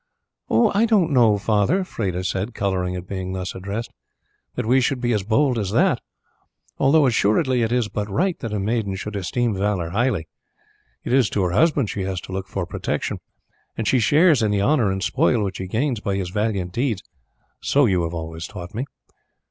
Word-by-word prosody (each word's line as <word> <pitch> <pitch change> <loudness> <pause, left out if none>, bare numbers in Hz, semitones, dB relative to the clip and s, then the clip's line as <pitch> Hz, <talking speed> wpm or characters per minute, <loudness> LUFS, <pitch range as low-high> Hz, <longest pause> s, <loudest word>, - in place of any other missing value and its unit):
"I 200 - +3
don't 195 -8 +3
know, 115 -6 +4
father," 110 - +1
Freda 95 - -3
said, 100 +5 -2
colouring 90 -2 -1
at 90 0 -6
being 95 -1 -4
thus 95 0 -4
addressed, 100 +5 -5 0.6
"that 125 - -2
we 130 +4 +4
should 130 +1 0
be 120 -1 0
as 105 - +1
bold 120 +5 +1
as 100 -3 -2
that, - - +2 0.8
although 145 +2 +4
assuredly 125 +2 +2
it 115 0 0
is 120 -3 +1
but 105 0 -4
right 180 - +1
that 115 - -5
a 105 - -1
maiden 105 -1 -1
should 105 +2 -6
esteem 115 +5 -1
valour 95 -4 -1
highly. 105 -6 0 0.8
It - - -2
is 130 -6 +4
to 100 - 0
her 90 - 0
husband 140 - +2
she 100 - -4
has 95 -1 -2
to - - -10
look 95 +1 -4
for 95 -2 -3
protection, - - -3 0.6
and 115 - -2
she 130 - +3
shares 150 +3 +4
in 110 - +2
the 100 -1 +1
honour 125 -5 +3
and 95 +1 -2
spoil 115 -4 +2
which 95 -1 -4
he 95 - -4
gains 120 +4 -1
by 100 -1 -2
his 95 -2 -3
valiant 105 -3 -1
deeds, 115 -2 -1 0.6
so 145 0 +3
you 95 -5 +2
have 85 0 -3
always 80 +1 -5
taught 90 -1 -9
me." 120 +5 -3
105 Hz, 195 wpm, -22 LUFS, 95-125 Hz, 0.8 s, know